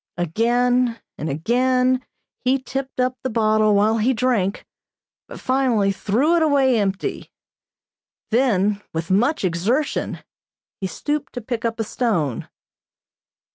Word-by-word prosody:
Again 240 +7 +1 0.2
and 155 - -3
again 255 - +1 0.4
he 255 +2 +3
tipped 265 0 -5
up 255 0 0
the 260 - -2
bottle 215 -2 +3
while 215 +3 +3
he 245 +5 +2
drank, 220 -5 0 0.6
but - - -10
finally 250 -6 +1
threw 225 - +1
it 340 - +2
away 275 -6 +3
empty. 195 -1 -2 1.0
Then, 210 -4 +2
with 160 +2 -3
much 240 +5 +2
exertion, 205 - -1 0.6
he 190 - -2
stooped 295 +8 -3
to 245 - -5
pick 235 0 -4
up 230 0 -2
a - - +1
stone. 200 - -1
230 Hz, 125 wpm, -21 LUFS, 200-255 Hz, 1.0 s, he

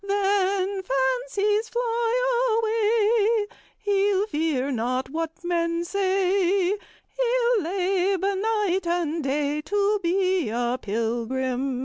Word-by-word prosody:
Then, 395 -1 0
fancies 280 - 0
fly 480 0 +1
away, 445 -1 +2 0.3
He'll 405 -1 +1
fear 300 -7 -1
not 255 +2 -2
what 325 +2 -4
men 340 -1 -1
say; 380 -1 +1
He'll 480 +2 -1
labor 380 +2 0
night 400 -3 0
and 335 -2 -1
day 290 +2 -1
To 410 +4 +1
be 370 - +1
a 240 +2 -1
pilgrim." 245 +4 -2
380 Hz, 95 wpm, -24 LUFS, 300-415 Hz, 0.3 s, away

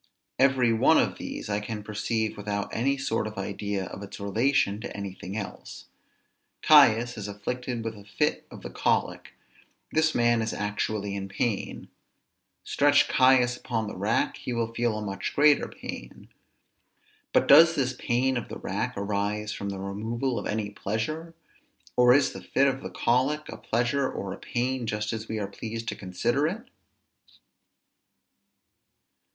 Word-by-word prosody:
Every 130 -3 +4
one 110 - +5
of - - +1
these - - -6
I 105 0 0
can 105 0 -5
perceive 110 +1 -2
without 100 0 -4
any 140 +4 +1
sort 115 -4 -1
of 110 - -9
idea 100 0 -3
of 95 - -8
its 100 - -9
relation 105 +1 +1
to 110 - -6
anything 100 0 -6
else. 105 - -7 0.8
Caius 120 -6 +6
is 105 - -5
afflicted 120 +4 -4
with 115 0 -4
a 100 - -12
fit 105 0 -1
of - - -12
the - - -7
colic; - - -1 0.6
this 160 0 +2
man 120 -1 +3
is 110 - -2
actually 105 0 -2
in 95 -1 -4
pain; 105 0 -2 0.8
stretch - - +4
Caius 130 -1 +4
upon 115 -3 -2
the 105 - -6
rack, - - 0
he 125 - -5
will 115 -1 -2
feel 115 -2 0
a 110 - -4
much 100 -1 -4
greater 150 0 +5
pain: - - -9 1.0
but - - +3
does 165 +4 +8
this 130 -2 0
pain 125 +1 0
of 120 - -5
the - - -6
rack - - -3
arise 105 +1 -2
from 100 - -4
the 100 - -4
removal 110 +6 -2
of - - -5
any 105 -1 -2
pleasure? 155 +12 -4 0.6
or 125 0 +6
is 135 +1 +4
the - - -9
fit 140 - +2
of 135 -1 0
the - - -6
colic 135 +6 +1
a - - -6
pleasure 120 +4 0
or 95 -1 -5
a - - -10
pain 125 0 -2
just 105 +1 -2
as 110 0 -5
we 110 - -3
are 105 - -2
pleased 115 +3 -6
to - - -4
consider 120 +10 0
it? 210 +8 -4
115 Hz, 160 wpm, -27 LUFS, 105-130 Hz, 1.0 s, does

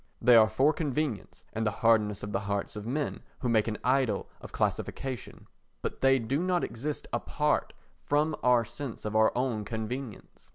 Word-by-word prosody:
They 125 - +6
are 110 -1 +7
for 135 +8 +3
convenience 145 -6 -3
and 110 - -1
the 110 - +2 0.2
hardness 105 -3 +3
of 105 - -4
the 95 - 0
hearts 100 +1 -2
of 105 +1 -6
men 145 +4 -2 0.2
who 125 - 0
make 110 -2 +3
an 110 -1 -2
idol 125 -5 +1
of - - -10
classification, 130 -5 -3 0.4
but - - -4
they 135 0 +5
do 130 +5 -1
not 180 -1 +1
exist 140 +6 -4
apart - - 0 0.3
from 150 +2 +1
our 125 -2 +4
sense 120 0 -7
of 105 0 -3
our 110 0 +5
own 125 -4 0
convenience. 110 +3 -6
120 Hz, 175 wpm, -29 LUFS, 110-135 Hz, 0.4 s, are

